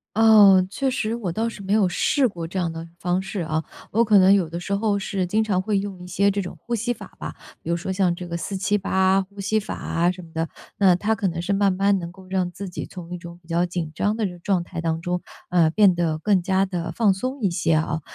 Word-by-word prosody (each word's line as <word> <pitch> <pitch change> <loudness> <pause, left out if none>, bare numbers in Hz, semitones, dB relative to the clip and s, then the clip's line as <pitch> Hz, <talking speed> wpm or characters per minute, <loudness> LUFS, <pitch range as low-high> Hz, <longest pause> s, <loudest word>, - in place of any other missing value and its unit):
哦， 205 -4 +7
确 270 +7 -1
实 230 -3 -1
我 210 -7 -3
倒 220 +7 -1
是 220 -3 -7
没 195 +1 -1
有 210 -3 +4
试 260 +9 +2
过 170 -6 -6
这 190 - -6
样 175 -3 0
的 165 0 -7
方 180 +1 0
式 190 0 -4
啊。 160 -1 -1 0.3
我 230 +3 +3
可 215 -2 +5
能 190 0 +7
有 185 -5 +2
的 170 +2 -5
时 200 +3 -4
候 205 0 +1
是 195 -2 -2
经 215 +5 +1
常 195 -4 0
会 205 +1 0
用 195 -2 -4
一 - - -9
些 200 +3 +2
这 200 +1 -1
种 180 - -7
呼 240 - -6
吸 235 +2 0
法 230 - -12
吧， - - -6 0.3
比 - - -7
如 170 - +1
说 175 +2 -4
像 185 -2 +2
这 180 0 -7
个 170 - -4
478 190 +1 +1
呼 200 +1 -12
吸 215 +2 +1
法 215 - -5
啊， 170 +2 0
什 180 0 -9
么 165 - -15
的， 165 0 -2 0.3
那 190 -3 +5
它 210 +5 0
可 200 -2 -1
能 170 -1 -3
是 185 +3 -1
慢 200 0 +3
慢 195 +1 +2
能 170 -1 -6
够 190 +1 -15
让 185 -1 -1
自 195 +3 -7
己 180 - -5
从 180 -1 -9
一 - - -4
种 170 0 -10
比 170 - -26
较 170 +1 +1
紧 175 -3 -4
张 205 +7 0
的 190 -6 -3
状 180 0 0
态 170 - -6
当 165 -1 -1
中， 180 +1 -2 0.3
呃， 170 -3 +4
变 195 +2 +5
得 170 -3 0
更 195 +3 +2
加 190 +2 +2
地 175 -3 -4
放 215 -4 +3
松 255 +7 -4
一 200 - +2
些 170 -1 +1
啊。 155 0 0
190 Hz, 280 characters per minute, -23 LUFS, 175-200 Hz, 0.3 s, 哦